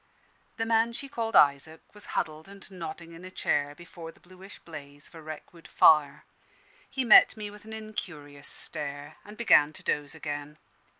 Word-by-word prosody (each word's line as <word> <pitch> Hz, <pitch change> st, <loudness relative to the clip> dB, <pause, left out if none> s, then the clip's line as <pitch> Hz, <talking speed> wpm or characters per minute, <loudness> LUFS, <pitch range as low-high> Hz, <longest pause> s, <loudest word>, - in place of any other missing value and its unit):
The 225 Hz, -, -1 dB
man 225 Hz, +1 st, +2 dB
she 275 Hz, -, -3 dB
called 230 Hz, -6 st, -3 dB
Isaac 145 Hz, +3 st, +4 dB
was 210 Hz, -1 st, -16 dB
huddled 155 Hz, +1 st, -3 dB
and 200 Hz, 0 st, -13 dB
nodding 170 Hz, -2 st, -8 dB
in 165 Hz, +2 st, -12 dB
a 185 Hz, -, -8 dB
chair, 145 Hz, -5 st, -1 dB
before 170 Hz, 0 st, -11 dB
the -, -, -24 dB
bluish 185 Hz, +2 st, -14 dB
blaze 145 Hz, -3 st, -12 dB
of -, -, -24 dB
a 165 Hz, -, -11 dB
wreck 155 Hz, +1 st, -9 dB
wood 170 Hz, -1 st, -15 dB
fire. 150 Hz, -3 st, +4 dB, 0.6 s
He 265 Hz, -2 st, -2 dB
met 225 Hz, -1 st, +7 dB
me 210 Hz, -1 st, -6 dB
with 210 Hz, 0 st, -14 dB
an 220 Hz, -, -9 dB
incurious 155 Hz, -10 st, -7 dB
stare, 145 Hz, -2 st, -3 dB
and 210 Hz, +1 st, -13 dB
began 155 Hz, -10 st, +5 dB
to -, -, -12 dB
doze 145 Hz, +1 st, -2 dB
again. 150 Hz, -1 st, -6 dB
165 Hz, 180 wpm, -28 LUFS, 150-210 Hz, 0.6 s, met